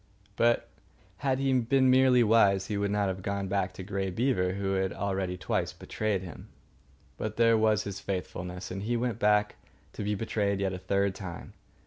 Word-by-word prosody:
But 120 Hz, 0 st, +2 dB, 0.5 s
had 135 Hz, -2 st, 0 dB
he 135 Hz, 0 st, +1 dB
been 130 Hz, +1 st, +3 dB
merely 130 Hz, -1 st, +5 dB
wise 100 Hz, -4 st, +4 dB
he 105 Hz, -, -3 dB
would 100 Hz, 0 st, 0 dB
not 100 Hz, 0 st, +1 dB
have 95 Hz, 0 st, -3 dB
gone 100 Hz, 0 st, -2 dB
back 95 Hz, -1 st, 0 dB
to 95 Hz, -, -8 dB
Grey 95 Hz, 0 st, -2 dB
Beaver 95 Hz, -3 st, 0 dB
who 95 Hz, 0 st, -2 dB
had 95 Hz, -1 st, 0 dB
already 95 Hz, -2 st, -2 dB
twice -, -, -2 dB
betrayed 105 Hz, -4 st, -2 dB
him. 90 Hz, -4 st, -10 dB, 0.7 s
But 110 Hz, 0 st, -4 dB
there 115 Hz, 0 st, +5 dB
was 110 Hz, -1 st, +2 dB
his 100 Hz, -1 st, -5 dB
faithfulness, 90 Hz, -1 st, -5 dB
and 95 Hz, +1 st, -4 dB
he 120 Hz, +4 st, -1 dB
went 120 Hz, -2 st, -2 dB
back 105 Hz, 0 st, +2 dB, 0.4 s
to -, -, -5 dB
be 105 Hz, +1 st, 0 dB
betrayed 100 Hz, -2 st, -1 dB
yet 95 Hz, -1 st, -1 dB
a 90 Hz, -, -5 dB
third 100 Hz, +1 st, 0 dB
time. 95 Hz, -4 st, -8 dB
100 Hz, 185 wpm, -29 LUFS, 95-115 Hz, 0.7 s, merely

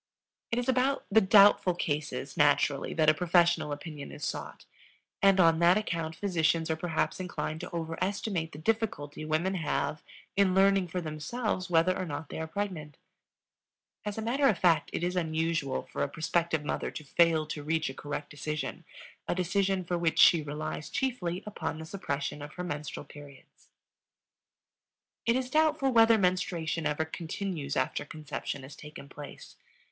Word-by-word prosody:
It 230 Hz, -, -1 dB
is 245 Hz, -, -1 dB
about 260 Hz, +2 st, +1 dB
the 220 Hz, +2 st, +6 dB
doubtful 200 Hz, -3 st, +6 dB
cases, 145 Hz, -4 st, -3 dB
naturally, 145 Hz, -1 st, +2 dB
that 155 Hz, -1 st, +2 dB
a 155 Hz, -, +7 dB
professional 170 Hz, -2 st, +2 dB
opinion 145 Hz, 0 st, -7 dB
is 145 Hz, -, -6 dB
sought, -, -, -5 dB, 0.6 s
and 195 Hz, -1 st, +5 dB
on 165 Hz, -2 st, +5 dB
that 175 Hz, +3 st, +5 dB
account 165 Hz, -6 st, -2 dB
physicians 165 Hz, -4 st, +1 dB
are -, -, +1 dB
perhaps 160 Hz, +2 st, -1 dB
inclined 175 Hz, -3 st, -4 dB
to -, -, -7 dB
overestimate 170 Hz, +1 st, -2 dB
the -, -, -10 dB
difficulty 155 Hz, -6 st, -2 dB
women 160 Hz, +5 st, 0 dB
have 155 Hz, -4 st, -1 dB, 0.3 s
in 195 Hz, -2 st, +3 dB
learning 195 Hz, -1 st, +4 dB
for 180 Hz, +2 st, -3 dB
themselves 180 Hz, +6 st, -3 dB
whether 175 Hz, +2 st, +3 dB
or 185 Hz, -, -3 dB
not 145 Hz, 0 st, -5 dB
they -, -, -6 dB
are 160 Hz, -, -3 dB
pregnant. 160 Hz, -6 st, -4 dB, 1.1 s
As 210 Hz, 0 st, -4 dB
a 220 Hz, -, -3 dB
matter 270 Hz, +5 st, +2 dB
of 215 Hz, -, +3 dB
fact, 165 Hz, -4 st, +3 dB
it -, -, -3 dB
is 180 Hz, +1 st, -1 dB
unusual 160 Hz, -4 st, -1 dB
for -, -, -6 dB
a 140 Hz, -, 0 dB
prospective 160 Hz, 0 st, 0 dB
mother -, -, -2 dB
to 155 Hz, -, -8 dB
fail 160 Hz, +1 st, +3 dB
to 150 Hz, 0 st, -5 dB
reach 160 Hz, +2 st, 0 dB
a 135 Hz, -, -4 dB
correct 145 Hz, +1 st, -6 dB
decision 150 Hz, +1 st, -4 dB, 0.4 s
a -, -, 0 dB
decision 190 Hz, +1 st, +1 dB
for 175 Hz, 0 st, -2 dB
which 165 Hz, -2 st, 0 dB
she 170 Hz, -, +7 dB
relies 150 Hz, +1 st, -5 dB
chiefly 190 Hz, -10 st, -2 dB
upon 160 Hz, -7 st, -4 dB
the 160 Hz, -, -7 dB
suppression 145 Hz, -5 st, -4 dB
of 145 Hz, +1 st, -8 dB
her 180 Hz, -, -5 dB
menstrual 150 Hz, -3 st, -5 dB
periods. 140 Hz, -1 st, -15 dB, 1.6 s
It 230 Hz, -, +4 dB
is 255 Hz, 0 st, -2 dB
doubtful 310 Hz, -3 st, +3 dB
whether 225 Hz, -1 st, +6 dB
menstruation 175 Hz, -4 st, 0 dB
ever 150 Hz, +1 st, 0 dB
continues 160 Hz, -2 st, -4 dB
after -, -, 0 dB
conception 145 Hz, -2 st, -6 dB
has 135 Hz, +2 st, -10 dB
taken 150 Hz, -2 st, -11 dB
place. 145 Hz, +1 st, -11 dB
165 Hz, 165 wpm, -29 LUFS, 150-190 Hz, 1.6 s, a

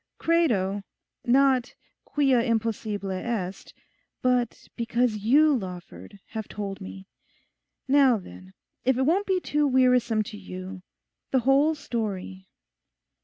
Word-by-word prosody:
Credo_—not 250 Hz, -, +1 dB, 0.3 s
quia 270 Hz, -4 st, +2 dB
impossible 220 Hz, -4 st, -1 dB
est_, 190 Hz, -1 st, -4 dB, 0.5 s
but 250 Hz, -2 st, 0 dB
because 235 Hz, -1 st, 0 dB
you, 285 Hz, +8 st, +4 dB
Lawford, 190 Hz, -1 st, -7 dB
have 220 Hz, -2 st, -5 dB
told 200 Hz, -1 st, -6 dB
me. 190 Hz, 0 st, -9 dB, 0.8 s
Now 270 Hz, -3 st, +5 dB
then, 90 Hz, -, -12 dB, 0.3 s
if 260 Hz, 0 st, +2 dB
it 265 Hz, -, +2 dB
won't 355 Hz, +9 st, +2 dB
be 380 Hz, -1 st, +2 dB
too 295 Hz, -4 st, +1 dB
wearisome 250 Hz, -4 st, +3 dB
to 210 Hz, 0 st, -9 dB
you, 185 Hz, -1 st, -8 dB, 0.5 s
the 260 Hz, -, +2 dB
whole 275 Hz, +5 st, +4 dB
story. 200 Hz, -8 st, -4 dB
235 Hz, 110 wpm, -26 LUFS, 195-265 Hz, 0.8 s, Now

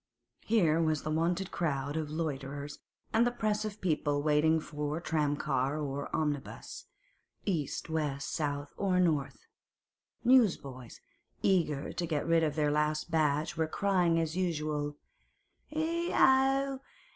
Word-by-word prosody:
Here 170 Hz, -8 st, +3 dB
was 155 Hz, -2 st, +1 dB
the 155 Hz, -, -2 dB
wonted 170 Hz, +4 st, 0 dB
crowd 145 Hz, -3 st, -1 dB
of 155 Hz, -2 st, -2 dB
loiterers 145 Hz, -2 st, -4 dB, 0.3 s
and 225 Hz, +1 st, +5 dB
the 240 Hz, -, +3 dB
press 215 Hz, -3 st, -1 dB
of 210 Hz, 0 st, -5 dB
people 150 Hz, -5 st, 0 dB
waiting 155 Hz, +1 st, +3 dB
for 150 Hz, 0 st, -4 dB
tramcar 145 Hz, -4 st, 0 dB
or 140 Hz, -1 st, -3 dB
omnibus—east, 155 Hz, -, -4 dB
west, 150 Hz, -4 st, -2 dB
south, 145 Hz, -1 st, -2 dB
or 185 Hz, -2 st, +1 dB
north; 145 Hz, -8 st, 0 dB, 0.8 s
newsboys, 165 Hz, -, +2 dB, 0.4 s
eager 155 Hz, -7 st, +1 dB
to 175 Hz, -, -2 dB
get 155 Hz, -3 st, -1 dB
rid 165 Hz, 0 st, +3 dB
of 150 Hz, -2 st, 0 dB
their 150 Hz, -2 st, +2 dB
last 150 Hz, +2 st, 0 dB
batch, 150 Hz, -1 st, +1 dB
were 160 Hz, -1 st, 0 dB
crying 180 Hz, -2 st, +2 dB
as 165 Hz, 0 st, -1 dB
usual, 150 Hz, -5 st, -1 dB, 0.7 s
'Ech 335 Hz, +3 st, -1 dB
ow! 270 Hz, +1 st, +4 dB
155 Hz, 125 wpm, -31 LUFS, 145-185 Hz, 0.8 s, and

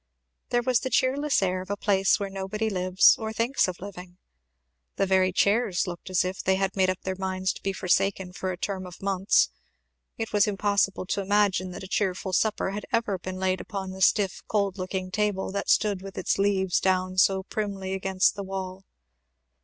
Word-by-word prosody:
There 240 Hz, 0 st, +1 dB
was 250 Hz, -1 st, +2 dB
the 260 Hz, -, -3 dB
cheerless 270 Hz, -1 st, +2 dB
air 185 Hz, 0 st, 0 dB
of 185 Hz, -, -10 dB
a 205 Hz, -, -2 dB
place 195 Hz, -2 st, +2 dB
where 200 Hz, -1 st, -4 dB
nobody 195 Hz, +3 st, -3 dB
lives, 185 Hz, 0 st, +5 dB
or 220 Hz, -1 st, -3 dB
thinks 230 Hz, +3 st, +1 dB
of 180 Hz, -1 st, -5 dB
living. 180 Hz, -2 st, -9 dB, 0.8 s
The -, -, +1 dB
very 185 Hz, -1 st, +3 dB
chairs 200 Hz, 0 st, +2 dB
looked 175 Hz, +1 st, -7 dB
as 185 Hz, 0 st, +2 dB
if 185 Hz, +1 st, -3 dB
they 190 Hz, -, +3 dB
had 195 Hz, 0 st, -1 dB
made 190 Hz, -1 st, +3 dB
up 185 Hz, -, -2 dB
their 190 Hz, 0 st, -3 dB
minds 190 Hz, 0 st, -1 dB
to -, -, -12 dB
be 195 Hz, -, -1 dB
forsaken 190 Hz, 0 st, 0 dB
for 185 Hz, +1 st, -3 dB
a 180 Hz, -, -5 dB
term 185 Hz, 0 st, -4 dB
of 180 Hz, -, -12 dB
months; 195 Hz, 0 st, +2 dB, 0.7 s
it 225 Hz, -1 st, -4 dB
was 205 Hz, -1 st, +4 dB
impossible 200 Hz, -1 st, 0 dB
to 200 Hz, -, -1 dB
imagine 195 Hz, -2 st, +2 dB
that -, -, -8 dB
a -, -, -7 dB
cheerful 190 Hz, -1 st, -1 dB
supper 210 Hz, 0 st, +1 dB
had 205 Hz, +1 st, -6 dB
ever 210 Hz, -5 st, 0 dB
been 185 Hz, +1 st, -6 dB
laid 185 Hz, 0 st, 0 dB
upon 190 Hz, -2 st, -5 dB
the 190 Hz, 0 st, -9 dB
stiff 195 Hz, 0 st, +2 dB
cold 200 Hz, -2 st, 0 dB
looking 185 Hz, 0 st, -4 dB
table 205 Hz, -2 st, -1 dB
that 200 Hz, 0 st, -3 dB
stood 205 Hz, -3 st, +2 dB
with 195 Hz, 0 st, -9 dB
its -, -, 0 dB
leaves 190 Hz, -2 st, +2 dB
down 185 Hz, 0 st, +1 dB
so 190 Hz, 0 st, +3 dB
primly 195 Hz, -2 st, -4 dB
against 190 Hz, 0 st, +2 dB
the 200 Hz, -, -6 dB
wall. 190 Hz, 0 st, -6 dB
190 Hz, 200 wpm, -26 LUFS, 185-205 Hz, 0.8 s, lives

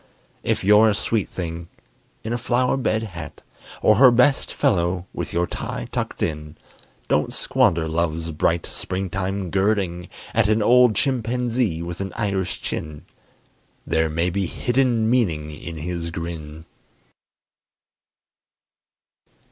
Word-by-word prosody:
If -, -, -1 dB
you're 105 Hz, +3 st, +6 dB
a 105 Hz, -, +1 dB
sweet 110 Hz, -1 st, -1 dB
thing 85 Hz, -1 st, -5 dB, 0.5 s
in 110 Hz, -, -3 dB
a -, -, 0 dB
flower 125 Hz, +2 st, +1 dB
bed 115 Hz, -4 st, 0 dB
hat, 90 Hz, -7 st, -8 dB, 0.4 s
Or 110 Hz, -, +5 dB
her 130 Hz, +2 st, +8 dB
best 125 Hz, +3 st, +3 dB
fellow 85 Hz, +1 st, +1 dB
with -, -, -4 dB
your 85 Hz, +1 st, +1 dB
tie -, -, -5 dB
tucked -, -, -3 dB
in, 75 Hz, -1 st, -4 dB, 0.5 s
Don't -, -, +1 dB
squander 80 Hz, -1 st, +1 dB
love's 80 Hz, 0 st, -1 dB
bright 85 Hz, +2 st, 0 dB
springtime 95 Hz, 0 st, -3 dB
girding 95 Hz, -3 st, 0 dB, 0.2 s
at 115 Hz, -2 st, +3 dB
An 110 Hz, 0 st, +2 dB
old 125 Hz, -1 st, +5 dB
chimpanzee 120 Hz, -, 0 dB
with 85 Hz, +2 st, -5 dB
an 95 Hz, -, -4 dB
Irish 100 Hz, -4 st, -2 dB
chin: 75 Hz, -2 st, -5 dB, 0.8 s
There 80 Hz, 0 st, +1 dB
may 85 Hz, +3 st, 0 dB
be 95 Hz, 0 st, -1 dB
hidden 120 Hz, -1 st, +1 dB
meaning 85 Hz, -11 st, +1 dB
in 80 Hz, +2 st, -8 dB
his 85 Hz, +1 st, -4 dB
grin. 80 Hz, -2 st, -7 dB
95 Hz, 125 wpm, -23 LUFS, 85-110 Hz, 0.8 s, her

